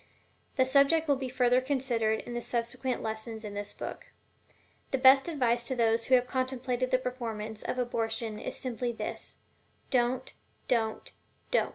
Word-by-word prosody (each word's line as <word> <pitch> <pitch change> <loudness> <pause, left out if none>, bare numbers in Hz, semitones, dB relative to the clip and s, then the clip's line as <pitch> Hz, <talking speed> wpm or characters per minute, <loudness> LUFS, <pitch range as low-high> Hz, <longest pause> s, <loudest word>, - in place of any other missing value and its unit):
The 260 - +4
subject 280 +5 +4
will 285 - +4
be 265 -1 -4
further 250 0 +3
considered 250 -5 0
in 240 - -8
the 240 - -2
subsequent 240 +2 -2
lessons 220 0 -4
in 205 - -6
this 205 0 -5
book. - - -7 0.8
The 270 - 0
best 265 +2 +7
advice 245 -6 +1
to 260 - -1
those 230 -1 +2
who 260 - +5
have 250 0 +3
contemplated 255 -1 -1
the 255 - +4
performance 225 -4 -5
of - - -3
abortion 225 -3 -2
is - - -5
simply 240 -2 -3
245 Hz, 140 wpm, -30 LUFS, 225-260 Hz, 0.8 s, best